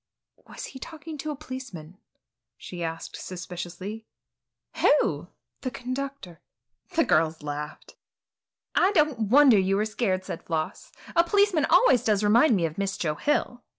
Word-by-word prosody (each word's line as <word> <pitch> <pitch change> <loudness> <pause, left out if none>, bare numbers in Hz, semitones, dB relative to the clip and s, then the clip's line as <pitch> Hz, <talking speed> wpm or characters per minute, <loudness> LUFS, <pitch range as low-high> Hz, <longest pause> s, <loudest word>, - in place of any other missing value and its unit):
"Was - - -8
he 265 - -10
talking 315 +2 -8
to 310 - -4
a 300 - -3
policeman?" 230 - -9 0.6
she 175 -1 -8
asked 165 0 -5
suspiciously. 185 +4 -7 0.7
"Who?" 175 - +2 0.3
"The 255 - -2
conductor." 255 - -6 0.5
The 330 - +4
girls 160 0 +1
laughed. 150 0 -6 0.8
"I 370 +3 +4
don't 295 - +2
wonder 265 -4 +7
you 190 +1 +1
were 210 +2 +1
scared," 195 -4 -1
said 165 - -5
Floss; 165 - -4 0.2
"a 335 - +6
policeman 380 -4 +3
always 300 -8 +5
does 210 -2 +2
remind 230 +5 +5
me 175 -4 +1
of 160 +3 -4
Miss 195 0 -1
Joe 155 -3 -1
Hill." 245 - -1
215 Hz, 145 wpm, -26 LUFS, 175-280 Hz, 0.8 s, wonder